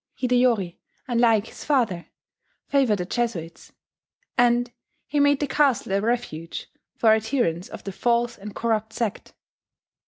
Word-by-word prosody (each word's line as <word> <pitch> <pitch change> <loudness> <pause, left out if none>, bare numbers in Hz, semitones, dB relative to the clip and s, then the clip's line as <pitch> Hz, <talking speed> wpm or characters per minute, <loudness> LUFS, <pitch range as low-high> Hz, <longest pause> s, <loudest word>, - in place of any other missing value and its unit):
Hideyori, 245 -8 +2 0.3
unlike 230 -3 +3
his - - -11
father, 230 - 0 0.6
favoured 265 -7 +2
the 180 - -3
Jesuits: 185 -7 -3 0.6
and 245 0 +3 0.3
he 295 - -1
made 285 -1 +4
the 290 - +1
castle 275 -8 +1
a 200 - +2
refuge 215 -8 -3 0.2
for 225 - +4
adherents 220 -6 0
of - - -9
the 195 - -5
"false 235 +4 +1
and 205 +1 -10
corrupt 220 -1 -1
sect." 230 -4 -4
235 Hz, 130 wpm, -24 LUFS, 200-245 Hz, 0.6 s, made